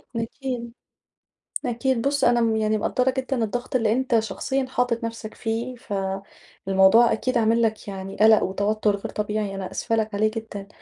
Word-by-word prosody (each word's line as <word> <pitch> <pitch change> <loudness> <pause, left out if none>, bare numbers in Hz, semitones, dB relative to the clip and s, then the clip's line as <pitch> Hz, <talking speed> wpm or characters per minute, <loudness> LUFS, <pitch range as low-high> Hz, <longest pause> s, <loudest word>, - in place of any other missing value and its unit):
أكيد، 235 0 -4 0.9
أكيد، 245 0 0
بُصّ 280 +1 0
أنا 240 0 +4
م 225 -1 +2
يعني 215 0 +1
مقدّرة 255 +4 +1
جدًا 260 -2 -1
الضغط 245 +4 -3
اللي 225 -4 +2
أنت 245 -1 +2
شخصيًا 265 +4 -2
حاطط 245 -2 0
نفْسَك 225 -1 -5
فيه، 235 +3 -3
ف 230 -3 -8 0.7
الموضوع 195 +5 +6
أكيد 255 +3 0
عامل 230 +1 +3
لك 220 -2 -1
يعني 195 0 -6
قلق 220 +1 +6
وتوتُّر 205 +2 0
غير 200 - -6
طبيعي 210 -1 -2
أنا 190 -1 -5
آسفة 225 - -1
لك 220 -1 -1
عليه 215 +1 +2
جدًا، 210 -3 -6
225 Hz, 165 wpm, -24 LUFS, 215-245 Hz, 0.9 s, الموضوع